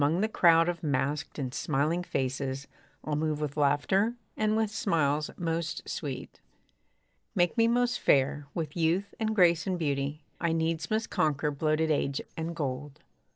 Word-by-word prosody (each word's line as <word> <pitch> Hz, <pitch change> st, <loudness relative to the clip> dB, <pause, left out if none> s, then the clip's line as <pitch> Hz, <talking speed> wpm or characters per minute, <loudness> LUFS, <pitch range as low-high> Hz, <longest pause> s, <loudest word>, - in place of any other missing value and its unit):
Among 155 Hz, +6 st, +2 dB
the 215 Hz, -, +2 dB
crowd 165 Hz, -5 st, +5 dB
of 175 Hz, -2 st, -2 dB
masked 145 Hz, 0 st, -1 dB
and 130 Hz, -3 st, -3 dB
smiling 155 Hz, +5 st, 0 dB
faces, 135 Hz, -3 st, -2 dB, 0.4 s
I'll 150 Hz, -, -2 dB
move 155 Hz, 0 st, -1 dB
with 150 Hz, -2 st, -3 dB
laughter, 155 Hz, +10 st, +2 dB, 0.2 s
and 215 Hz, 0 st, +1 dB
with 220 Hz, -2 st, +1 dB
smiles 155 Hz, -9 st, +1 dB
most 170 Hz, 0 st, -2 dB
sweet. 135 Hz, -4 st, -5 dB, 0.9 s
Make 175 Hz, 0 st, +2 dB
me 230 Hz, -1 st, +4 dB
most 245 Hz, +1 st, +2 dB
fair! 140 Hz, +1 st, +2 dB
with 155 Hz, -4 st, -3 dB
youth 175 Hz, +4 st, +1 dB
and 220 Hz, -1 st, 0 dB
grace 170 Hz, -3 st, +4 dB
and 185 Hz, -1 st, 0 dB
beauty, 145 Hz, -1 st, -2 dB, 0.2 s
I 170 Hz, -2 st, +1 dB
needs 160 Hz, -1 st, -1 dB
must 220 Hz, +1 st, -1 dB
conquer 150 Hz, 0 st, +1 dB
bloated 155 Hz, +2 st, +1 dB
age 140 Hz, -2 st, 0 dB, 0.2 s
and 165 Hz, +1 st, -4 dB
gold. 145 Hz, 0 st, -4 dB
160 Hz, 155 wpm, -29 LUFS, 145-175 Hz, 0.9 s, crowd